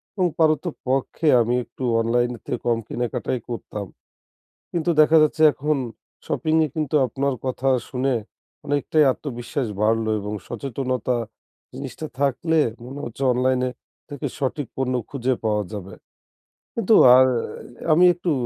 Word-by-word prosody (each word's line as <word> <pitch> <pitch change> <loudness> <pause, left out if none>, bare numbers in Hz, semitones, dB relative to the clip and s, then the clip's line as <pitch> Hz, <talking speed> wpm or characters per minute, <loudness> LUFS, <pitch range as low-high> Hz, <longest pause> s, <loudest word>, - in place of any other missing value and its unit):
এবং 185 -3 +2
পারতপক্ষে 155 -2 0
আমি 120 +2 +1
একটু 125 - -10 0.2
অনলাইনের 120 +1 0
থেকে - - -2
কম 120 -1 +2
কেনাকাটাই 120 +1 -2
করতাম। 105 -3 -5 0.9
কিন্তু 170 0 -1
দেখা 155 +1 +5
যাচ্ছে 155 +1 0
এখন 150 +3 0 0.5
শপিংয়ে 160 0 +1
কিন্তু 155 -2 -1
আপনার 140 +3 -1
কথা 130 +1 -2 0.2
শুনে 130 0 0 0.5
অনেকটাই 145 +2 +2
আত্মবিশ্বাস 125 -1 -4
বাড়লো 110 +1 +2
এবং 105 +1 -5
সচেতনতা 125 +1 -2 0.6
জিনিসটা 135 +4 -6
থাকলে 145 +4 +1 0.3
মনে 135 +3 -8
হচ্ছে 120 +4 -6
অনলাইনে 125 0 +1 0.4
থেকে 145 -3 -4
সঠিক 140 0 -2
পণ্য 130 -1 0 0.2
খুঁজে 130 -2 0
পাওয়া 105 -1 +1
যাবে 100 -2 -7 0.8
কিন্তু 225 -1 +4 0.2
আর 130 0 +7 0.7
আমি 175 +4 +6
একটু 175 0 -2
130 Hz, 125 wpm, -23 LUFS, 120-150 Hz, 0.9 s, আর